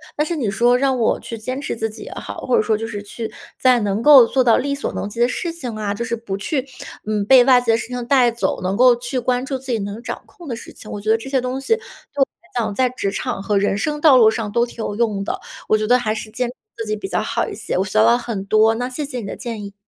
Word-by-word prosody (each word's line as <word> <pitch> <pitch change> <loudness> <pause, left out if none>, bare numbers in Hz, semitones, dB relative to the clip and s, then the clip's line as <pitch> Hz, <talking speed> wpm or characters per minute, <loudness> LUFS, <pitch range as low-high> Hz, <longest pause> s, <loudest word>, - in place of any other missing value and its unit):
但 300 - +1
是 335 +2 -2
你 240 -9 -1
说 240 +5 +3
让 265 0 +1
我 230 - +1
去 230 - -7
坚 255 +5 -4
持 275 - -3
自 225 -1 -2
己 215 - -10
也 - - -9
好， - - -7
或 250 - +3
者 - - +4
说 215 0 +1
就 225 +1 -4
是 210 -2 -5
去 220 +2 -6 0.3
在 255 -2 +5
能 205 +1 -1
够 280 -2 +9
做 260 +2 +1
到 235 -2 +5
力 280 +1 -1
所 280 - -3
能 - - -3
及 230 - -8
的 240 - +4
事 340 +7 -3
情 255 -9 -6
啊， 210 -2 -2
就 205 - -4
是 235 - -2
不 220 -4 -5
去， 260 +7 -2 0.4
嗯， 210 -1 0
被 255 +3 +7
外 250 -2 +6
界 230 -2 +1
的 - - +3
事 230 - -5
情 250 -1 -4
带 250 -3 +4
走， 235 - -2
能 185 +1 -1
够 250 +2 +6
去 245 +2 -3
关 250 +1 0
注 270 0 -3
自 265 -1 -6
己 230 - +1
能 205 +2 -5
掌 - - -6
控 345 -4 -14
的 240 - -3
事 230 - -11
情。 215 - -11
我 205 - -5
觉 215 +2 -4
得 225 - +4
这 225 +4 -8
些 270 -1 +2
东 255 +2 -3
西 450 - +2
对 450 - -11 0.4
我 270 - +7
来 350 - -30
讲， 215 -3 -1
在 255 +2 +2
职 220 -6 -3
场 240 -1 -3
和 205 0 +1
人 200 0 +1
生 295 +7 -2
道 295 -5 +7
路 225 -3 +7
上 220 -2 -3
都 235 +2 +2
挺 245 - -14
有 205 - -3
用 210 -3 0
的， - - -3 0.3
我 215 - +5
觉 215 - -1
得 250 +1 +5
还 215 -3 -1
是 220 0 -6
坚 245 +1 -2
持 - - -9 0.2
自 225 - -4
己 215 0 -2
比 - - -5
较 - - -1
好 - - -1
一 - - -6
些， - - -3
我 190 - +1
学 190 - -7
到 215 - +6
了 235 +1 +5
很 230 -5 -4
多， 215 +2 +3
那 245 +2 -3
谢 290 +3 -4
谢 255 -4 -5
你 - - -7
的 - - -6
建 230 -4 -5
议。 200 0 -8
235 Hz, 330 characters per minute, -20 LUFS, 215-255 Hz, 0.4 s, 够